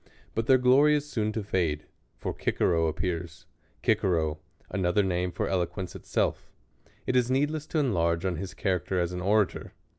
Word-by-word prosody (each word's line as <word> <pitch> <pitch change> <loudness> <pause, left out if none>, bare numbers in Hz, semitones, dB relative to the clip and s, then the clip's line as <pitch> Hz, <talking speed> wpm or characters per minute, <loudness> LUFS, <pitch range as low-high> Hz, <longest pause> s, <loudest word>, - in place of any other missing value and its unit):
Btit 115 0 -1
their 130 - +7
glor}' 130 +4 +5
is 150 -1 +1
soon 110 -6 -1
to 110 - -2
fade; 85 -6 -1 0.3
for - - -4
Cicero 80 -1 +2
appears; 85 0 -3 0.4
Cicero, 85 -8 +1 0.3
another 95 +1 +2
name 90 -1 0
for 105 +5 -2
eloquence 90 -1 -2
itself. - - -1 0.6
Jt 130 - +1
is 125 -1 +3
needless 145 +3 0
to 160 - -2
enlarge 85 - +1
on 90 -3 0
his 95 +3 -6
character 95 -1 0
a« - - +3
an 90 - -4
orator. 100 +1 +1
95 Hz, 160 wpm, -28 LUFS, 85-120 Hz, 0.6 s, their